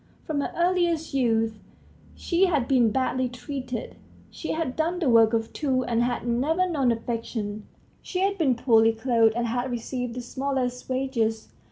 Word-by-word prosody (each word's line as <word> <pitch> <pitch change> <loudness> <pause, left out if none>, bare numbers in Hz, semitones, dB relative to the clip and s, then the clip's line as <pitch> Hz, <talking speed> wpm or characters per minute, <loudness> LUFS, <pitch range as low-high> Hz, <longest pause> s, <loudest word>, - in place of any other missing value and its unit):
From 295 -2 -1
her - - -3
earliest 345 -3 +1
youth 225 -4 +1 0.6
she 365 +2 +2
had 295 -8 +1
been 250 -4 +4
badly 255 +2 0
treated; 250 -1 -6 0.3
she 320 - -4
had 315 -5 -2
done 330 +3 0
the 315 -8 +1
work 225 -1 +6
of 225 -1 -1
two, 265 -4 0
and 235 -1 0
had 240 0 -1
never 305 +10 +1
known 280 -8 +1
affection; 225 -2 -4 0.3
she 365 - -3
had 395 +1 +2
been 295 -9 +2
poorly 225 -2 +4
clothed 225 -1 +2
and 240 0 0
had 245 +2 -1
received 245 0 -4
the 250 - -4
smallest 255 0 -3
wages. 240 -4 -1
250 Hz, 165 wpm, -25 LUFS, 230-285 Hz, 0.6 s, work